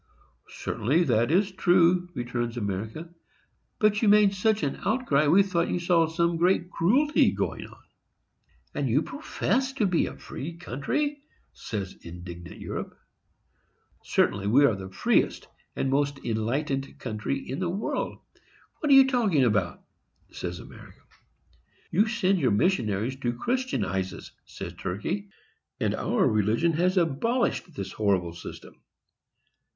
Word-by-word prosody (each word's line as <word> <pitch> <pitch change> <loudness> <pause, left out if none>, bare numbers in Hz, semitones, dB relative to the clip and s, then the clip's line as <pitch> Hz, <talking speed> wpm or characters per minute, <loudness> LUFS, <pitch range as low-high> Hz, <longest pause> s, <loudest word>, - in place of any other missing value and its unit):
"Certainly 145 +11 0
that 120 -4 +2
is 195 +5 +2
true," 180 -1 +3
returns 120 -1 -3
America; 110 - -4 0.6
"but 210 -1 +2
you 225 - +3
made 205 -1 +6
such 215 +2 +1
an 140 - -1
outcry, 155 - +2
we 185 +7 +6
thought 175 -3 0
you - - 0
saw 170 -2 +3
some 170 +1 0
great 175 +1 +2
cruelty 265 - +3
going - - -3
on." - - -18 0.9
"And - - -1
you - - +2
profess 265 0 -1
to 240 -6 +1
be 180 -3 +2
a - - -8
free 160 +5 -7
country!" 275 - -2 0.3
says 100 -4 -5
indignant 85 0 -9
Europe. - - -6 1.0
"Certainly 100 0 +1
we 135 +7 +5
are 135 - +4
the 95 -1 -7
freest 95 - +1 0.3
and 135 - -1
most 140 0 +1
enlightened 135 +5 -2
country 110 +3 -3
in 135 +1 -6
the 180 -2 -1
world,—what 210 - -5
are 275 - +8
you 270 0 +9
talking 225 - +2
about?" 105 -7 0 0.5
says 90 -1 -5
America. - - -13 0.9
"You 205 +6 +3
send 195 -4 +1
your 130 -6 +2
missionaries 110 - +1
to 120 -3 -1
Christianize 115 - -2
us," - - -11
says - - -8
Turkey; 190 - -4 0.5
"and - - 0
our - - +1
religion 110 - +2
has 180 +4 +1
abolished 180 - 0
this 100 -6 -5
horrible 95 -5 0
system." 85 - -11
155 Hz, 135 wpm, -27 LUFS, -, 1.0 s, you